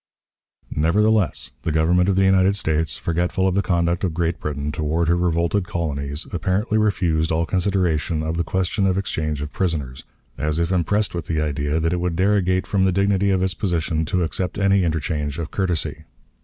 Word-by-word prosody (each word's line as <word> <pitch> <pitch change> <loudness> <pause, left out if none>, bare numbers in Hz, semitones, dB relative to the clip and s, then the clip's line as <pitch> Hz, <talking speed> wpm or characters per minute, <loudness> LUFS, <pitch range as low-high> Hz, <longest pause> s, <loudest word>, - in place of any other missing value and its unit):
Nevertheless, 95 - +2
the 80 - -2
Government 85 +4 +3
of 95 - +2
the 95 - +3
United 95 +1 +4
States, 80 -4 0
forgetful 90 +3 0
of 95 - +1
the 100 - +2
conduct 85 -2 0
of 85 -4 -1
Great 85 -1 -1
Britain 75 0 -3
toward 80 +2 -1
her 85 - +3
revolted 85 +2 0
colonies, 75 -3 -3
apparently 95 +6 0
refused 85 -7 +1
all 80 +1 +1
consideration 90 -4 0
of 80 +1 -2
the 85 - 0
question 95 +3 0
of 95 0 +1
exchange 75 -6 -2
of 75 - -7
prisoners, 75 -9 -2 0.4
as 75 +2 0
if 85 +1 0
impressed 100 +4 +1
with 85 -3 -4
the 80 -2 -1
idea 75 0 -1
that 80 +1 0
it 90 - -1
would 90 -1 -1
derogate 95 -1 +2
from 100 -2 +1
the 95 - +3
dignity 100 +1 +2
of 95 -1 +2
its 95 -1 +1
position 85 -5 -1
to 90 +3 0
accept 90 +2 -2
any 100 -1 +3
interchange 75 -2 -2
of 85 -2 -5
courtesy. 90 -5 -2
85 Hz, 185 wpm, -22 LUFS, 80-95 Hz, 0.4 s, United